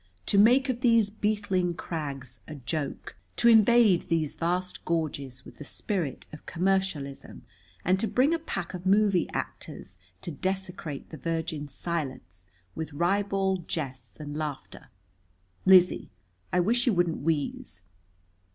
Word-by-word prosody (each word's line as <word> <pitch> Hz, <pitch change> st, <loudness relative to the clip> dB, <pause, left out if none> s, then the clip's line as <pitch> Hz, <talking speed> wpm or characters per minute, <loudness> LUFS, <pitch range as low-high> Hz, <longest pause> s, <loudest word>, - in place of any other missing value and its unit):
To 200 Hz, -, +3 dB
make 250 Hz, +6 st, +6 dB
of 250 Hz, -2 st, -2 dB
these 230 Hz, -5 st, +4 dB
beetling 205 Hz, -4 st, 0 dB
crags 140 Hz, -8 st, -5 dB
a 155 Hz, -, -7 dB
joke! 140 Hz, +2 st, -4 dB, 0.2 s
To -, -, +3 dB
invade 225 Hz, -4 st, +6 dB
these 160 Hz, -3 st, 0 dB
vast 180 Hz, +2 st, -2 dB
gorges 140 Hz, -6 st, -2 dB
with -, -, -13 dB
the -, -, -8 dB
spirit 165 Hz, -, -3 dB
of 150 Hz, -, -11 dB
commercialism 175 Hz, -9 st, -1 dB, 0.4 s
and 185 Hz, +2 st, +3 dB
to 225 Hz, -, +1 dB
bring 260 Hz, +9 st, +3 dB
a 335 Hz, -, 0 dB
pack 195 Hz, -, -5 dB
of 180 Hz, 0 st, -5 dB
movie 200 Hz, -2 st, +3 dB
actors 95 Hz, 0 st, -6 dB, 0.3 s
to 170 Hz, -, -4 dB
desecrate 180 Hz, -3 st, -4 dB
the 160 Hz, -, -7 dB
virgin 160 Hz, -3 st, -3 dB
silence 130 Hz, -, -5 dB, 0.3 s
with 160 Hz, +4 st, -5 dB
ribald 190 Hz, +2 st, 0 dB
jests 130 Hz, -7 st, -5 dB
and 145 Hz, -1 st, -6 dB
laughter! 150 Hz, -3 st, -5 dB, 0.8 s
Lizzie, 185 Hz, -1 st, +6 dB, 0.4 s
I 180 Hz, -, +3 dB
wish 235 Hz, +7 st, +1 dB
you 240 Hz, -, +5 dB
wouldn't 175 Hz, -2 st, +1 dB
wheeze!" 145 Hz, -, -2 dB
175 Hz, 135 wpm, -28 LUFS, 145-195 Hz, 0.8 s, make